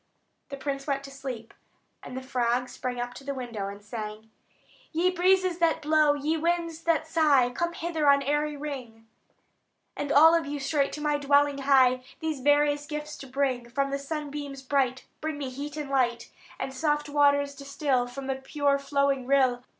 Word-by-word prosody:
The 275 Hz, -, -6 dB
prince 275 Hz, 0 st, -4 dB
went 275 Hz, -1 st, -1 dB
to 275 Hz, -, -9 dB
sleep; 260 Hz, -5 st, -7 dB, 0.5 s
and 255 Hz, -, -8 dB
the 260 Hz, -, -5 dB
frog 250 Hz, -1 st, 0 dB
sprang 245 Hz, 0 st, -4 dB
up 245 Hz, 0 st, -3 dB
to 275 Hz, -, -11 dB
the 280 Hz, 0 st, -4 dB
window, 235 Hz, -6 st, -4 dB
and 200 Hz, +1 st, -8 dB
sang: 215 Hz, 0 st, -7 dB, 0.6 s
"Ye 350 Hz, +3 st, +2 dB
breezes 370 Hz, 0 st, +2 dB
that 335 Hz, -1 st, +2 dB
blow, 300 Hz, -1 st, +3 dB
ye 300 Hz, +3 st, -1 dB
winds 335 Hz, 0 st, -1 dB
that 330 Hz, -1 st, +2 dB
sigh, 295 Hz, -6 st, +3 dB
Come 340 Hz, +6 st, -2 dB
hither 325 Hz, -4 st, 0 dB
on 280 Hz, 0 st, +5 dB
airy 295 Hz, +1 st, 0 dB
wing; 255 Hz, -6 st, -7 dB, 0.9 s
And 290 Hz, 0 st, -3 dB
all 320 Hz, +4 st, +8 dB
of 330 Hz, -3 st, +1 dB
you 290 Hz, 0 st, -3 dB
straight 280 Hz, 0 st, 0 dB
to 300 Hz, -, -5 dB
my 295 Hz, -1 st, +1 dB
dwelling 285 Hz, 0 st, +3 dB
hie, 260 Hz, -2 st, +4 dB, 0.2 s
These 315 Hz, -3 st, -2 dB
various 290 Hz, +1 st, +2 dB
gifts 300 Hz, 0 st, -5 dB
to 270 Hz, -, -10 dB
bring. 260 Hz, -3 st, -1 dB
From 275 Hz, +2 st, -1 dB
the 275 Hz, -, -1 dB
sunbeams 285 Hz, -2 st, -5 dB
bright 260 Hz, -1 st, 0 dB, 0.2 s
Bring 310 Hz, -1 st, -3 dB
me 275 Hz, -3 st, -4 dB
heat 285 Hz, +3 st, -6 dB
and 300 Hz, -2 st, -4 dB
light; 240 Hz, -3 st, 0 dB, 0.3 s
And 265 Hz, -, -4 dB
soft 295 Hz, +1 st, 0 dB
waters 285 Hz, -1 st, +3 dB
distil 275 Hz, -2 st, -1 dB
From 270 Hz, +2 st, -7 dB
the 270 Hz, 0 st, -2 dB
pure 280 Hz, +1 st, 0 dB
flowing 280 Hz, -2 st, 0 dB
rill. 260 Hz, -3 st, +3 dB
280 Hz, 180 wpm, -27 LUFS, 260-300 Hz, 0.9 s, all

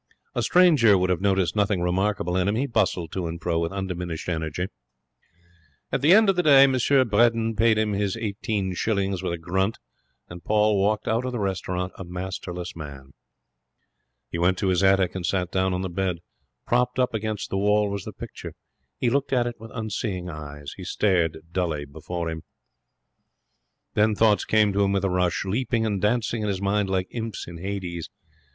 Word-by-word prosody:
A -, -, -1 dB
stranger 150 Hz, -, +5 dB
would 90 Hz, 0 st, +1 dB
have 90 Hz, -, 0 dB
noticed 95 Hz, -2 st, +1 dB
nothing 105 Hz, -2 st, +1 dB
remarkable 90 Hz, 0 st, 0 dB
in 95 Hz, 0 st, +1 dB
him. 100 Hz, -, +1 dB
He 130 Hz, +5 st, 0 dB
bustled 95 Hz, -, 0 dB
to 90 Hz, -3 st, -3 dB
and 85 Hz, +1 st, -5 dB
fro 85 Hz, 0 st, 0 dB
with 85 Hz, 0 st, -1 dB
undiminished 90 Hz, -4 st, -4 dB
energy. 80 Hz, +1 st, -2 dB, 1.3 s
At -, -, 0 dB
the 150 Hz, +4 st, +5 dB
end 220 Hz, 0 st, +6 dB
of 195 Hz, -, +3 dB
the 180 Hz, -, +2 dB
day 140 Hz, -5 st, +7 dB
M. 135 Hz, -, +5 dB
Bredin 115 Hz, -3 st, +3 dB
paid 110 Hz, +1 st, +3 dB
him 110 Hz, -1 st, +1 dB
his 100 Hz, +1 st, -1 dB
eighteen 100 Hz, -3 st, -2 dB
shillings 100 Hz, -1 st, -1 dB
with 95 Hz, -, -2 dB
a 85 Hz, -, -2 dB
grunt, 95 Hz, +6 st, -1 dB, 0.5 s
and 85 Hz, 0 st, -10 dB
Paul 105 Hz, -1 st, +2 dB
walked 105 Hz, +2 st, 0 dB
out 115 Hz, +2 st, +1 dB
of 130 Hz, -, -3 dB
the -, -, -2 dB
restaurant 95 Hz, -2 st, -2 dB
a -, -, -4 dB
masterless 90 Hz, 0 st, -6 dB
man. 70 Hz, -4 st, -9 dB, 1.2 s
He 85 Hz, -, -3 dB
went 90 Hz, +2 st, +2 dB
to 95 Hz, -, 0 dB
his 90 Hz, -1 st, +2 dB
attic 95 Hz, -1 st, +3 dB
and 95 Hz, -, -5 dB
sat 90 Hz, +1 st, -1 dB
down 95 Hz, 0 st, +1 dB
on 90 Hz, +1 st, -2 dB
the -, -, -1 dB
bed. 90 Hz, 0 st, -2 dB, 0.5 s
Propped 125 Hz, +1 st, +1 dB
up 125 Hz, -1 st, +1 dB
against 110 Hz, -1 st, -3 dB
the 95 Hz, -, 0 dB
wall 105 Hz, 0 st, +2 dB
was 100 Hz, -2 st, -4 dB
the -, -, -7 dB
picture. -, -, -9 dB, 0.4 s
He 120 Hz, -, +1 dB
looked 140 Hz, +2 st, 0 dB
at 125 Hz, -2 st, +2 dB
it 120 Hz, -1 st, -5 dB
with 115 Hz, +1 st, -10 dB
unseeing 105 Hz, -5 st, -3 dB
eyes. 75 Hz, -2 st, -8 dB
He 95 Hz, -, -8 dB
stared 90 Hz, -4 st, +1 dB
dully 85 Hz, -5 st, -1 dB
before 85 Hz, +4 st, -5 dB
him. 80 Hz, 0 st, -4 dB, 1.5 s
Then 105 Hz, 0 st, +3 dB
thoughts 105 Hz, -1 st, +3 dB
came 105 Hz, -2 st, +3 dB
to 100 Hz, -, +1 dB
him 100 Hz, 0 st, +1 dB
with 100 Hz, 0 st, +1 dB
a 95 Hz, -, 0 dB
rush, 90 Hz, +1 st, 0 dB
leaping 115 Hz, +3 st, 0 dB
and 100 Hz, -4 st, -1 dB
dancing 115 Hz, +1 st, 0 dB
in 105 Hz, -, -1 dB
his 100 Hz, -2 st, -1 dB
mind 100 Hz, 0 st, 0 dB
like 95 Hz, -1 st, 0 dB
imps 115 Hz, -3 st, -5 dB
in 85 Hz, -1 st, -9 dB
Hades. 90 Hz, -3 st, -4 dB
95 Hz, 195 wpm, -25 LUFS, 90-110 Hz, 1.5 s, day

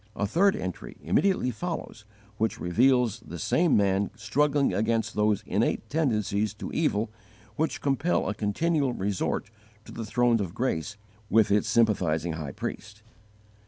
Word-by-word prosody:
A 100 Hz, -, -1 dB
third 185 Hz, -, +3 dB
entry 90 Hz, -1 st, -6 dB
immediately 190 Hz, -10 st, +2 dB
follows 125 Hz, -5 st, -5 dB, 0.3 s
which 110 Hz, +1 st, 0 dB
reveals 120 Hz, +4 st, +2 dB
this 85 Hz, -7 st, -7 dB
same 170 Hz, -2 st, +3 dB
man 100 Hz, 0 st, +2 dB
struggling 140 Hz, +6 st, +1 dB
against 115 Hz, +1 st, 0 dB
those 105 Hz, -1 st, +1 dB
innate 105 Hz, +5 st, 0 dB
tendencies 110 Hz, -, 0 dB
to -, -, -7 dB
evil 110 Hz, -9 st, 0 dB, 0.4 s
which 160 Hz, +1 st, -1 dB
compel 145 Hz, +5 st, +1 dB
a -, -, -1 dB
continual 135 Hz, +7 st, 0 dB
resort 100 Hz, +1 st, -2 dB, 0.3 s
to -, -, -11 dB
the 115 Hz, -, -5 dB
throne 120 Hz, +1 st, +2 dB
of 90 Hz, -3 st, -5 dB
grace 110 Hz, -5 st, -2 dB, 0.3 s
with 110 Hz, -1 st, +4 dB
its 105 Hz, +1 st, +2 dB
sympathizing 85 Hz, -8 st, +2 dB
High 75 Hz, -4 st, -5 dB
Priest. 105 Hz, -1 st, -7 dB
110 Hz, 140 wpm, -27 LUFS, 100-135 Hz, 0.4 s, with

